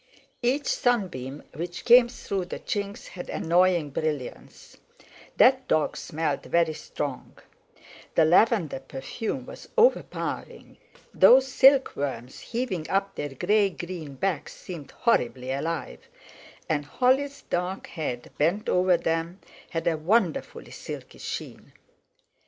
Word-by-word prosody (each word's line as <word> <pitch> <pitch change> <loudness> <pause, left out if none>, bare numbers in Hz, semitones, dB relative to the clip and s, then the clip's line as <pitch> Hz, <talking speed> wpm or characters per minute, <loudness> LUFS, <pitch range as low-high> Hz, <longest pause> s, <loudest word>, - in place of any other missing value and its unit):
Each 260 +4 +1
sunbeam 175 - -1
which 175 +2 -6
came 240 0 +7
through 195 -6 -4
the 175 - -6
chinks 200 -3 -4
had 175 - -8
annoying 170 -2 +2
brilliance; 150 -3 -5 0.6
that 260 0 +5
dog 155 -1 +1
smelled 155 -2 -2
very 170 -2 +1
strong; 145 -3 -6 0.8
the 160 - +5
lavender 175 - +3
perfume 135 - -5
was - - -11
overpowering; 475 +2 0 0.3
those 260 +1 +7
silkworms 145 - +2
heaving 225 -10 -3
up 195 0 0
their 145 - -4
grey 205 +7 +3
green 170 -5 -7
backs 165 0 -2
seemed 165 -6 -8
horribly 130 - 0
alive; 140 - -3 0.7
and 150 -2 0
Holly's 265 - +1
dark 180 +2 -2
head 125 -7 -5
bent 175 +8 +1
over 180 -1 +4
them 165 +2 -2 0.3
had 165 -1 -3
a 165 -2 +2
wonderfully 185 +1 0
silky - - -8
sheen. - - -7
175 Hz, 115 wpm, -26 LUFS, 150-220 Hz, 0.8 s, came